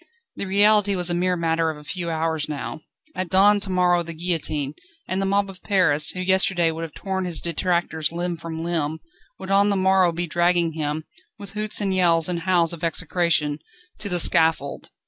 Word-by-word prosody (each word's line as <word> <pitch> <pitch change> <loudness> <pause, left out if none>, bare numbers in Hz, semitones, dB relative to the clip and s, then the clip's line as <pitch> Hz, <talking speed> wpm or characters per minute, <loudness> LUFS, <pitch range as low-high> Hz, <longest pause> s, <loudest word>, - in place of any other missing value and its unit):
The 200 - -4
reality 205 +1 +3
was 180 -1 +1
a - - +1
mere 180 +1 0
matter 165 -1 0
of 155 - -5
a 150 - -13
few 175 +2 -4
hours 160 -2 -2
now. 150 +1 -5 0.3
At 185 -2 -3
dawn 205 +2 +5
to 200 - -3
morrow 180 -1 +2
the 170 -1 -6
guillotine; 155 -4 -2 0.3
and 185 +2 -2
the 195 - 0
mob 200 +1 +1
of 190 -2 -12
Paris, 165 -7 +2
who 185 - -3
yesterday 185 -2 +2
would 160 +1 -6
have 165 -2 -7
torn 190 -1 -3
his 175 -2 -2
detractors 170 -2 -1
limb 175 +1 -2
from 165 0 -6
limb, 160 -2 -1 0.4
would 190 0 -7
on 200 +1 +4
the 200 - +1
morrow 190 -2 +3
be 170 +1 -3
dragging 175 0 +1
him, 155 0 -3 0.3
with 200 -3 -10
hoots 215 0 -1
and 195 -2 0
yells 170 -3 +3
and 175 -1 -2
howls 170 -1 +1
of 170 - -8
execration, 165 -3 0 0.4
to 205 - -2
the 180 -1 0
scaffold. 160 -5 +2
175 Hz, 200 wpm, -23 LUFS, 160-190 Hz, 0.4 s, dawn